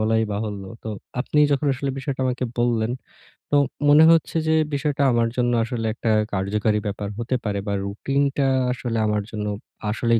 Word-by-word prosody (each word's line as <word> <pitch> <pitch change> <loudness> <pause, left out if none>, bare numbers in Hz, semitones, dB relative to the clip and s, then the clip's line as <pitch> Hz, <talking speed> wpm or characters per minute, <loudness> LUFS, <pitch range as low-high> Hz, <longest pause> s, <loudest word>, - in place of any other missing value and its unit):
বলাই 110 +1 +2
বাহুল্য। 100 -1 -4 0.2
তো - - -4 0.3
আপনি 150 - -1
যখন 140 +1 0
আসলে 135 +1 -2
বিষয়টা 135 0 -4
আমাকে 125 0 -1
বললেন, 120 -1 +1 0.6
তো - - +2 0.3
মনে 150 +2 +8
হচ্ছে 165 0 +2
যে, 160 - +3 0.2
বিষয়টা 145 -1 0
আমার 115 -1 +2
জন্য 120 -1 +2
আসলে 115 -1 -3
একটা 115 0 -1 0.2
কার্যকারী 105 +2 0
ব্যাপার 100 0 -4
হতে 120 +2 -1
পারে। 100 -2 -1
বা 100 - 0
রুটিনটা 135 +7 0 0.2
আসলে 120 -2 -3
আমার 105 0 +1
জন্য 105 -1 -4 0.4
আসলেই 115 +2 +2
115 Hz, 165 wpm, -23 LUFS, 105-135 Hz, 0.6 s, মনে